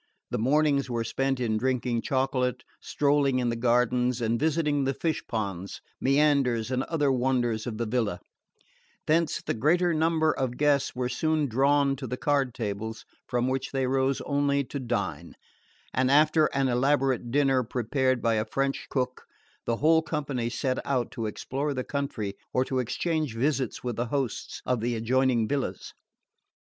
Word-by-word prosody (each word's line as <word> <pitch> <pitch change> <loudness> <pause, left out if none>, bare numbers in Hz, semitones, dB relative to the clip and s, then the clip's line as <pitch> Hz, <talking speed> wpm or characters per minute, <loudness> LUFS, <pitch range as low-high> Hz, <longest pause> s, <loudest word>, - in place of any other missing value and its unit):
The - - -1
mornings 140 +2 +2
were 120 -1 -1
spent 135 +3 -1
in 110 -3 0
drinking 125 -1 0
chocolate, 130 -2 0 0.2
strolling 140 -2 +1
in 125 -1 +1
the 115 - -1
gardens 125 +1 +2
and 115 0 0
visiting 150 -2 +1
the 135 0 0
fish 160 -2 -1
ponds, 100 -4 -4 0.2
meanders 135 -4 +2
and 130 0 +1
other 150 -4 +1
wonders 125 -3 0
of 110 -3 -4
the 115 - -1
villa; 110 -5 -1 0.9
thence 165 +1 +1
the - - -1
greater 170 +9 +2
number 160 0 +2
of 130 -4 -2
guests 145 -3 +2
were 125 0 -1
soon 155 +4 0
drawn 140 +2 +2
to 130 -1 -6
the 125 +2 -4
card 140 -4 0
tables, 110 0 -4 0.2
from 125 0 0
which 130 0 -2
they 135 -1 +1
rose 135 +1 +1
only 140 0 +1
to 140 +2 -6
dine; 120 -5 -3 0.6
and 130 0 +2
after 155 +2 +5
an 135 -1 0
elaborate 130 -1 +1
dinner 135 0 +3
prepared 130 +2 0
by 115 -1 +3
a 110 0 0
French 135 0 -1
cook 125 -2 -2 0.4
the 115 - +1
whole 160 +4 +4
company 140 -7 -2
set 130 +1 -1
out 130 -3 -1
to 115 -3 -3
explore 140 +7 -3
the 130 - -2
country 130 -9 -3 0.2
or 130 +1 +2
to 130 -1 -1
exchange 150 +2 -1
visits 135 0 -1
with 120 -3 -3
the 120 +1 -1
hosts 135 -2 -3
of 125 -2 +1
the 120 +2 -1
adjoining 120 0 +2
villas. 140 0 -3
130 Hz, 165 wpm, -27 LUFS, 120-140 Hz, 0.9 s, after